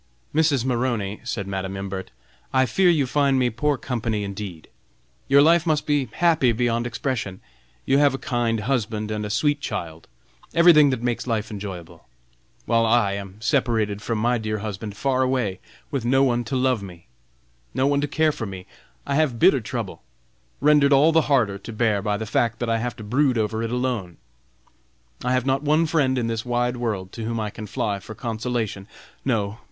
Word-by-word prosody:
"Mrs. 150 -5 +2
Maroney," 120 -5 -1
said 120 -5 -3
Madam 95 0 -4
Imbert, 95 -1 -5 0.4
"I 130 0 +3
fear 185 +7 +3
you 155 -5 +3
find 140 0 +2
me 125 -2 +2
poor 145 +5 0
company, 115 -4 -2
indeed. 100 -5 -6 0.6
Your 140 +1 +6
life 170 +2 +4
must 155 -2 +1
be 145 -5 +1
happy 160 -8 +3
beyond 120 0 0
expression. 115 -6 -3 0.5
You 135 +1 +3
have 145 -2 +4
a - - -3
kind 120 -5 -1
husband, 110 -4 -1
a 105 -1 -3
sweet 145 +7 +1
child, 80 - -5 0.5
everything 165 -4 +7
that 130 -3 -2
makes 120 0 -2
life 110 -3 -1
enjoyable! 90 - -8 0.6
while 115 -1 +2
I 115 -3 +3
am 100 0 -7
separated 115 -5 0
from 115 0 -2
my 120 +2 +1
dear 110 -1 -2
husband, 105 0 -6
far 130 +1 +1
away, 125 -8 0 0.3
with 135 -4 -2
no 135 +3 +3
one 120 -2 +1
to 130 - -3
love 130 -3 +1
me! 90 -4 -11 0.7
no 130 - +2
one 140 0 +2
to 145 - 0
care 155 +2 +2
for 115 -7 -5
me! 95 -2 -8 0.4
I 140 - -2
have 140 -5 +1
bitter 145 -3 +5
trouble, 105 - -5 0.6
rendered 145 -1 +5
all 145 +4 +5
the 160 -2 +2
harder 110 -8 +2
to 110 - -9
bear 110 -2 +1
by 105 0 -1
the 110 - -4
fact 115 +1 0
that 120 0 -3
I 115 - +1
have 120 -1 -3
to 110 - -10
brood 130 +4 +1
over 110 0 -1
it 115 - -2
alone. 120 -8 -2 1.1
I 125 +1 +1
have 130 -1 +1
not 135 0 +1
one 155 +2 +2
friend 145 -5 +1
in 120 - 0
this 115 -1 -2
wide 120 0 -1
world 105 -6 -3
to 115 - -7
whom 115 +1 -2
I 105 -1 -3
can 110 0 -8
fly 100 0 -2
for 110 +3 -10
consolation. 115 -4 -3 0.4
No! 110 -4 -1
120 Hz, 190 wpm, -23 LUFS, 105-135 Hz, 1.1 s, everything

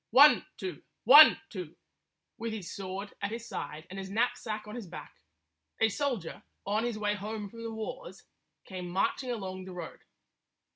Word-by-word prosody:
One, 290 +5 +7
two! 185 -6 -5 0.2
One, 290 +6 +10
two! 180 -7 -7 0.6
With 230 0 -3
his 200 -6 -6
sword 195 +1 -6
at 200 - -1
his 230 +2 -6
side 155 +2 -6
and 190 +1 -7
his 190 0 -6
knapsack 215 0 -1
on 210 - -7
his 235 -6 -6
back, 170 - -9 0.7
a 225 - +4
soldier, 240 - -2 0.2
on 215 +3 0
his 240 -3 -2
way 210 -1 0
home 210 0 -5
from 230 - -10
the 230 0 -4
wars, 220 - -7 0.4
came 180 -2 -6
marching 195 +8 0
along 190 -5 -4
the 185 - -8
road. 175 -2 -7
210 Hz, 165 wpm, -30 LUFS, 190-230 Hz, 0.7 s, One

